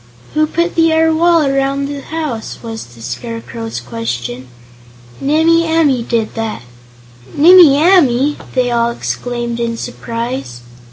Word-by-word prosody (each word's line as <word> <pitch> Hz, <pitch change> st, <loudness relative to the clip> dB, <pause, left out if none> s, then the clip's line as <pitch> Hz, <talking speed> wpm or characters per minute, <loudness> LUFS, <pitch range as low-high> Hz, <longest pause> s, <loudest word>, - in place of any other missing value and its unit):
"Who 310 Hz, 0 st, +2 dB
put 340 Hz, +3 st, -1 dB
the 330 Hz, -1 st, +3 dB
air 320 Hz, 0 st, +3 dB
wall 335 Hz, -1 st, +3 dB
around 275 Hz, 0 st, 0 dB
the 280 Hz, 0 st, -5 dB
house?" 300 Hz, -8 st, -5 dB
was 225 Hz, -1 st, -6 dB
the 120 Hz, -1 st, -15 dB
Scarecrow's 230 Hz, -, -6 dB
question. 120 Hz, +1 st, -5 dB, 0.7 s
"Nimmie 320 Hz, +4 st, +3 dB
Amee 295 Hz, -7 st, +2 dB
did 230 Hz, -2 st, -2 dB
that." 225 Hz, -, -4 dB, 0.7 s
"Nimmie 325 Hz, -2 st, +7 dB
Amee!" 295 Hz, -5 st, +3 dB, 0.2 s
they 250 Hz, -1 st, +1 dB
all 235 Hz, 0 st, +1 dB
exclaimed 240 Hz, 0 st, -4 dB
in 230 Hz, -1 st, -2 dB
surprise. 235 Hz, -, -5 dB
255 Hz, 125 wpm, -15 LUFS, 230-315 Hz, 0.7 s, Nimmie